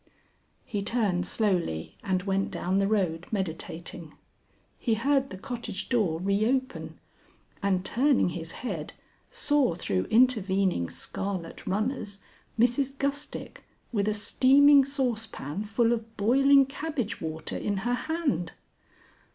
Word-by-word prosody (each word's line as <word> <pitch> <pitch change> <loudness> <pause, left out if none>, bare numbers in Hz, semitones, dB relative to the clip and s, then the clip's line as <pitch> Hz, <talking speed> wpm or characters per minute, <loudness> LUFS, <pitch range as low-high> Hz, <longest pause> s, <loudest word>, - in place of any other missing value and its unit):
He 205 - -3
turned 200 -5 0
slowly 180 - 0
and 185 -1 0
went 195 0 0
down 190 +2 -1
the 195 - +2
road 180 -6 0
meditating. 170 -4 -5 0.6
He 230 -3 +1
heard 275 +4 +1
the 190 - -7
cottage 235 -2 -5
door 200 -10 +1
re 200 +3 +1
open, 260 +1 -2 0.6
and 190 -2 +1
turning 260 -1 +3
his 165 -1 -6
head, 165 -10 -4 0.4
saw 295 - +2
through 95 - -1
intervening 195 - +2
scarlet 185 -4 -5
runners 210 +1 -2 0.4
Mrs 255 +4 +2
Gustick 280 +1 -4 0.3
with 205 -3 0
a 215 - +1
steaming 275 +6 +6
saucepan 225 - -3
full 230 +2 +2
of 225 -1 -6
boiling 275 +6 +5
cabbage 270 -6 -4
water 160 -1 -3
in 205 -1 -1
her 245 - +1
hand. 280 - -1
210 Hz, 120 wpm, -28 LUFS, 185-260 Hz, 0.6 s, steaming